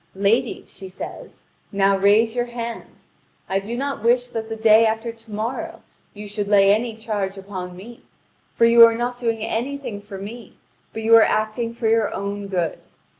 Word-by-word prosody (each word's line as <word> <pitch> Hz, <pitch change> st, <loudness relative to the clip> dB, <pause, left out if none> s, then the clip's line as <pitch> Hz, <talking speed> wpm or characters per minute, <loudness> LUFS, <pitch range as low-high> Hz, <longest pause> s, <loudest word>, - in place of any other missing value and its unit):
"Lady," 220 Hz, +5 st, 0 dB
she 190 Hz, -, -11 dB
says, 185 Hz, -, -9 dB, 0.3 s
"now 195 Hz, -1 st, +3 dB
raise 210 Hz, +4 st, +3 dB
your 240 Hz, 0 st, 0 dB
hand! 235 Hz, -1 st, -7 dB, 0.4 s
I 195 Hz, -, 0 dB
do 220 Hz, +5 st, -6 dB
not 275 Hz, -2 st, -3 dB
wish 245 Hz, +2 st, +2 dB
that 225 Hz, -1 st, -5 dB
the 225 Hz, -, -4 dB
day 220 Hz, 0 st, +5 dB
after 225 Hz, +1 st, -2 dB
to 225 Hz, -1 st, -17 dB
morrow 250 Hz, +11 st, -4 dB, 0.3 s
you 210 Hz, 0 st, -8 dB
should 205 Hz, 0 st, -4 dB
lay 200 Hz, -1 st, +5 dB
any 225 Hz, +1 st, -1 dB
charge 205 Hz, -3 st, -3 dB
upon 185 Hz, -2 st, -7 dB
me; 230 Hz, +5 st, -12 dB, 0.5 s
for 230 Hz, -, +4 dB
you 230 Hz, 0 st, +8 dB
are 230 Hz, 0 st, +7 dB
not 245 Hz, +1 st, -2 dB
doing 230 Hz, -3 st, -1 dB
anything 245 Hz, -2 st, -4 dB
for 205 Hz, -1 st, -9 dB
me, 210 Hz, +3 st, -10 dB, 0.3 s
but 220 Hz, -, -6 dB
you 225 Hz, +1 st, +6 dB
are 225 Hz, -, +8 dB
acting 215 Hz, +2 st, 0 dB
for 235 Hz, -1 st, -2 dB
your 225 Hz, -1 st, +2 dB
own 200 Hz, 0 st, -4 dB
good. 175 Hz, -4 st, -2 dB
220 Hz, 180 wpm, -22 LUFS, 200-235 Hz, 0.5 s, you